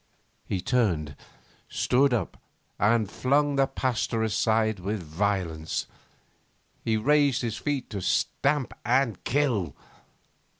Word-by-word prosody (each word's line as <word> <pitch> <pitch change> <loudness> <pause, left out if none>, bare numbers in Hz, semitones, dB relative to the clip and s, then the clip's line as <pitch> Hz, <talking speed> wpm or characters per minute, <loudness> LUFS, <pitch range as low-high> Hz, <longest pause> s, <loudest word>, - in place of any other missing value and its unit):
He 95 - -2
turned, 85 - 0 0.5
stood 135 +2 +2
up, 110 -8 -1 0.4
and 110 +1 +3
flung 140 +6 +1
the 135 -1 +3
Pasteur 115 -4 -1
aside 110 -1 +1
with 100 +1 -3
violence. 85 -1 -2 1.0
He 110 -1 +1
raised 140 +2 +3
his 115 -2 -2
feet 145 -1 -2
to 100 -3 -4
stamp 140 +8 0
and 120 -5 +1
kill 120 - 0
115 Hz, 110 wpm, -27 LUFS, 100-135 Hz, 1.0 s, and